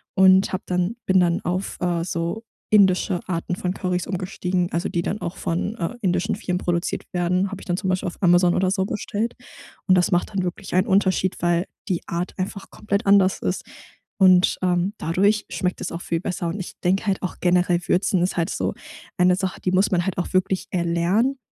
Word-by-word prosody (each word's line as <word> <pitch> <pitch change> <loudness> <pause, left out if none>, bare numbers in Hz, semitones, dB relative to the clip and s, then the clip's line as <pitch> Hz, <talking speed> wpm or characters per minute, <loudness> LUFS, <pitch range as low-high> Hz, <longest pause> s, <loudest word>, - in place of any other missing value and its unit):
und 190 0 +5
hab 185 - -4
dann 180 +4 -1
bin 190 0 +4
dann 175 -1 +2
auf, 180 +3 -3
äh, 175 -2 0
so 170 +5 -3 0.3
indische 190 -2 +4
Arten 175 0 -2
von 180 0 -2
Currys 180 -2 -2
umgestiegen, 180 -1 -2
also 170 +1 -1
die 170 - -1
dann 210 - -3
auch 170 +2 -4
von, 175 +6 -2
äh, 180 0 -3
indischen 185 +1 0
Firmen 185 -3 -2
produziert 175 -1 -2
werden, 180 +2 0
hab 195 - -7
ich - - -12
dann 175 -1 0
zum 190 - -3
Beispiel 185 +1 0
auf 175 - -6
Amazon 175 0 +5
oder 185 0 +1
so 190 -1 0
bestellt. 210 +3 -3 0.5
Und 185 - +6
das 180 -1 +3
macht 175 - +1
dann 195 -2 -1
wirklich 180 +2 -5
einen 185 +1 +2
Unterschied, 190 -1 +2
weil 175 +1 +2 0.2
die 180 -3 -1
Art 175 +2 -3
einfach 195 +1 -5
komplett 210 +1 -2
anders 195 -1 +4
ist - - -1 0.5
und, 185 -3 +5
ähm, 180 +2 +1
dadurch 200 +6 +1
schmeckt 180 -2 -2
es - - -4
auch 170 - -5
viel 165 -1 -2
besser. 180 0 -3
Und 170 +5 -3
ich 185 - -6
denke 190 +4 +1
halt 195 -1 0
auch 185 - -3
generell, 175 -1 +3
würzen 185 0 +2
ist 185 - -1
halt 165 -1 0
so - - -2 0.4
eine 180 0 +4
Sache, 190 -1 -3
die 180 - 0
muss 190 +2 +2
man 175 -2 +1
halt 190 - -2
auch 180 - -3
wirklich 185 0 +1
erlernen. 180 +9 +1
185 Hz, 205 wpm, -23 LUFS, 175-195 Hz, 0.5 s, Und